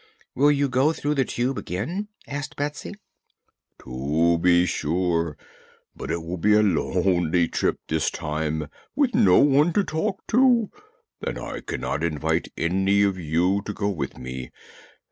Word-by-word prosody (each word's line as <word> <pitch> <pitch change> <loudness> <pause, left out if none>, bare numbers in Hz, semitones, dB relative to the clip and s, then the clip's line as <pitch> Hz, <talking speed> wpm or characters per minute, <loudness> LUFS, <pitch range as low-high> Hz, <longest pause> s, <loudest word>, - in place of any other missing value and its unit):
"Will 145 +3 +4
you 140 -1 +2
go 135 +4 +2
through 145 -1 -1
the 135 -3 +1
Tube 125 +3 -2
again?" 160 - -4 0.2
asked 145 +1 -5
Betsy. 150 +7 -4 0.9
"To 75 +7 +1
be 90 0 +4
sure. 85 -1 -1 0.6
But - - -7
it 85 0 -2
will 85 +2 -5
be 105 +5 +4
a 105 - +5
lonely 90 -3 +1
trip - - 0
this 80 -1 0
time, 75 0 -3 0.3
with 270 -3 +2
no 90 -2 +5
one 145 +4 +4
to 205 - +2
talk 190 +4 -3
to, 240 -2 +4 0.5
and - - -3
I - - -6
cannot 75 - -3
invite 75 -4 -1
any 95 +4 +2
of 100 -2 0
you 90 +5 +1
to 105 - -5
go 100 0 -1
with 75 -9 -4
me. 65 0 -7
95 Hz, 150 wpm, -24 LUFS, -, 0.9 s, a